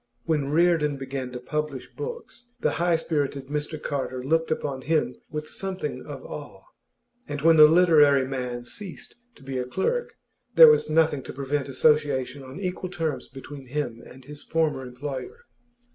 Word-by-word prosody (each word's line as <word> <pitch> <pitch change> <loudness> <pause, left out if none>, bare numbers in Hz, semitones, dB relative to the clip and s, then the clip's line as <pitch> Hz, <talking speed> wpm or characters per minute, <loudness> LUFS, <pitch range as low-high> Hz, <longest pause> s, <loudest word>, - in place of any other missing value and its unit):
When 150 -4 0
Reardon 155 -2 +3
began 135 -1 -5
to 125 - -6
publish 150 0 -3
books, 465 - -7
the - - +1
high 175 -1 +3
spirited 145 -4 -2
Mr 150 +1 -3
Carter 130 -3 -3
looked 165 +4 +1
upon 140 -4 -2
him 155 +3 0
with 155 0 -5
something 190 +3 -4
of - - -8
awe; - - -9 0.6
and 145 -1 -5
when 165 0 +7
the 155 -1 +10
literary 150 -5 +5
man 125 -2 -4
ceased 190 - -8 0.2
to 140 - -18
be 130 -1 -3
a 125 - -2
clerk, 475 - -1 0.4
there 480 -1 +11
was 455 - +2
nothing 155 -3 +3
to - - -8
prevent 140 +1 -2
association 140 -1 +2
on 130 +5 -9
equal 185 -1 -3
terms 155 -7 -3
between 135 0 -10
him 125 -4 -3
and 130 0 -14
his 145 +1 -9
former 160 -4 0
employer. 140 - -7
145 Hz, 160 wpm, -26 LUFS, 135-165 Hz, 0.6 s, there